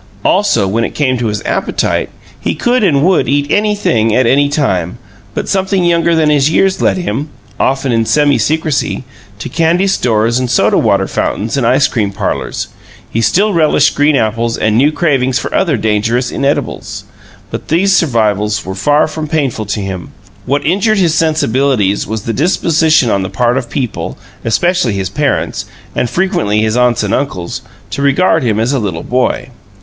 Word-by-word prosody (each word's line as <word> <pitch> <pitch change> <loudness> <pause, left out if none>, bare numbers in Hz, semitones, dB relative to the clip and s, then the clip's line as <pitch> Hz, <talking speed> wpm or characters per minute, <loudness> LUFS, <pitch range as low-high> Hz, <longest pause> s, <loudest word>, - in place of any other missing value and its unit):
Also, 190 - +2
when 110 +4 0
it - - -4
came 130 -4 +1
to 120 -2 -2
his 105 -1 -3
appetite, - - -1 0.3
he - - -2
could 245 -1 +1
and 145 -7 +3
would 185 -1 +2
eat 145 +1 +1
anything 205 - +1
at 130 - +3
any 140 +4 +3
time, 95 - -1 0.4
but - - -3
something 190 -1 0
younger 170 -1 +2
than 155 -2 +2
his 145 0 +3
years 190 +4 +1
led - - +2
him 145 - -3 0.3
often 135 0 0
in 115 -1 +2
semi 145 +1 +2
secrecy 155 -1 -1 0.3
to 105 - -6
candy 170 +3 +1
stores 115 - +1
and 125 -1 -2
soda 125 - +2
water - - +2
fountains 110 +5 -2
and 130 -4 +1
ice 130 +4 +3
cream 105 -5 -1
parlors; 100 - -3 0.4
he 115 - 0
still 200 - +2
relished 155 -3 +3
green 145 +1 +2
apples 115 -1 0
and 110 0 +1
knew 140 +6 +4
cravings 135 -6 +1
for - - -4
other 170 -8 +1
dangerous 110 +4 0
inedibles. 140 +1 -2 0.5
But - - -6
these 190 +5 +2
survivals 105 - +1
were 95 - -4
far 145 +10 +2
from 155 0 -5
painful 135 -9 -2
to 105 0 -2
him; 95 -3 -6 0.3
what 140 +2 0
injured 200 +6 +2
his 175 -5 +2
sensibilities 135 -9 +1
was 110 -1 -4
the 115 - -3
disposition 160 - +2
on 100 - +1
the 95 - -3
part 120 +5 0
of 130 -3 -3
people 125 -5 -4 0.3
especially 175 - +1
his 95 -2 -2
parents, 145 +2 -1 0.3
and 125 - 0
frequently 115 - 0
his 110 +1 0
aunts 125 -2 +2
and 105 - -1
uncles 95 -11 -3 0.3
to 140 - -3
regard 160 +4 +2
him 110 -4 0
as 115 +5 0
a 135 - +1
little 95 -7 -3
boy. 125 0 -1
135 Hz, 175 wpm, -13 LUFS, 110-160 Hz, 0.5 s, knew